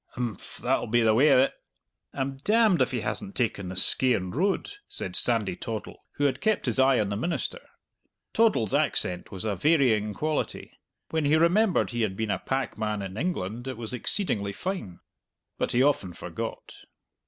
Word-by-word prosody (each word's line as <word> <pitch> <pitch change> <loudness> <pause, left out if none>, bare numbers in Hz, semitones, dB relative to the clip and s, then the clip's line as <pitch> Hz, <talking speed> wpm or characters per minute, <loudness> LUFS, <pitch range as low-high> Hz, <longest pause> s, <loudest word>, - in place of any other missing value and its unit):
"Imph, 120 -5 -5
that'll - - 0
be 120 +2 +2
the 110 -1 +4
way 135 +7 +5
o't." 130 +2 +5 0.6
"I'm 135 0 -3
demned 210 +4 +3
if - - +3
he - - -2
hasn't 200 -2 -4
taken 105 -6 -1
the 95 - -6
Skeighan 95 -1 +3
Road!" 190 - 0 0.2
said - - -4
Sandy - - +2
Toddle, - - -6
who 145 - -3
had 135 -2 +1
kept 220 -2 +1
his 125 0 -1
eye 130 -1 +5
on 105 -2 0
the 100 - -2
minister. 170 - -2 0.7
Toddle's 215 - +2
accent 90 -1 0
was 95 +2 -5
a 105 -2 0
varying 110 - +2
quality. 155 +4 -3 0.4
When 160 -2 0
he 145 +2 +4
remembered 180 +5 +3
he 120 -1 -2
had 100 -4 0
been 110 0 -2
a - - -1
packman 110 -6 -2
in 95 -1 -7
England 120 - -3
it 130 -3 -5
was 115 0 -6
exceedingly 110 - +1
fine. 175 - -5 0.6
But - - 0
he 125 +2 +3
often 120 -11 +1
forgot. - - -6
125 Hz, 175 wpm, -27 LUFS, 105-155 Hz, 0.7 s, way